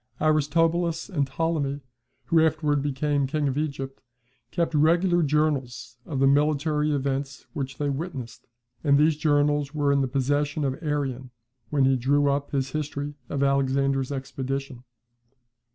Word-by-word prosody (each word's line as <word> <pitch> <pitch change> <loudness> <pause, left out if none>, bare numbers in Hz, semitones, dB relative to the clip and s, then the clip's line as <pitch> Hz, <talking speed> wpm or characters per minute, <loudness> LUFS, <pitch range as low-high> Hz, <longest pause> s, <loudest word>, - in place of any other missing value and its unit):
Aristobulus 165 +3 +1
and 145 -8 0
Ptolemy 145 -1 -1 0.4
(who 165 -1 +4
afterwards 155 -2 +1
became 145 0 0
king 150 +1 0
of 135 - -1
Egypt) 140 -3 -4 0.5
kept 170 +4 -1
regular 170 +4 +3
journals 140 -6 -1
of 145 - -3
the 135 - +3
military 150 +2 +2
events 140 -1 -2
which 135 -1 -4
they 145 - -1
witnessed; 135 -5 -5 0.4
and 140 -2 +4
these 155 +1 +4
journals 145 -1 +1
were 145 -1 +2
in 140 0 +3
the 135 - +1
possession 145 +3 0
of 135 +3 -2
Arrian, 135 -5 -2 0.4
when 140 -2 +2
he 135 0 +3
drew 140 +3 +2
up 140 +1 -2
his 135 -2 -1
history 145 -1 -3 0.2
of 140 -1 -1
Alexander's 135 0 +1
expedition. 135 -1 -4
145 Hz, 140 wpm, -25 LUFS, 135-155 Hz, 0.5 s, who